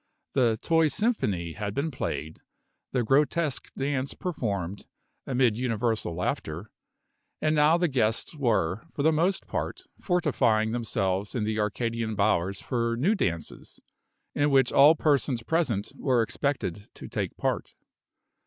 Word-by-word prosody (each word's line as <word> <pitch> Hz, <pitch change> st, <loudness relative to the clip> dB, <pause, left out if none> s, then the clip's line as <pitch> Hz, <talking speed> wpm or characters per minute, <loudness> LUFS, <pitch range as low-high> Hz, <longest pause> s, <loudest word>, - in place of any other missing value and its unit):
The 120 Hz, -5 st, +3 dB
"Toy 165 Hz, -1 st, +4 dB
Symphony" 105 Hz, -, -1 dB
had 100 Hz, +1 st, -4 dB
been 155 Hz, +3 st, -1 dB
played, 80 Hz, -, -4 dB, 0.5 s
the 125 Hz, -2 st, +1 dB
grotesque 145 Hz, +4 st, +1 dB
dance 135 Hz, 0 st, -1 dB
performed, 100 Hz, -, -3 dB, 0.4 s
amid 125 Hz, -4 st, +2 dB
universal 115 Hz, -7 st, -1 dB
laughter; 90 Hz, +2 st, -3 dB, 0.7 s
and 155 Hz, 0 st, +1 dB
now 150 Hz, +3 st, +5 dB
the 175 Hz, 0 st, +2 dB
guests 120 Hz, 0 st, 0 dB
were, 115 Hz, -, 0 dB
for 140 Hz, -, -1 dB
the 160 Hz, -, +5 dB
most 170 Hz, +5 st, +1 dB
part, -, -, -4 dB, 0.2 s
fortifying 125 Hz, -, +2 dB
themselves 105 Hz, -4 st, -1 dB
in 115 Hz, -, 0 dB
the 110 Hz, 0 st, -1 dB
Arcadian 115 Hz, +1 st, -1 dB
bowers 100 Hz, -2 st, +1 dB
for 115 Hz, -2 st, -1 dB
new 170 Hz, -, +3 dB
dances, 85 Hz, -, -3 dB, 0.5 s
in 145 Hz, 0 st, +2 dB
which 135 Hz, -3 st, +4 dB
all 145 Hz, +4 st, +7 dB
persons 140 Hz, -6 st, +1 dB
present 130 Hz, -10 st, 0 dB
were 125 Hz, -4 st, +2 dB
expected 110 Hz, -, -2 dB
to -, -, -8 dB
take -, -, -3 dB
part. -, -, -2 dB
120 Hz, 135 wpm, -27 LUFS, 105-145 Hz, 0.7 s, all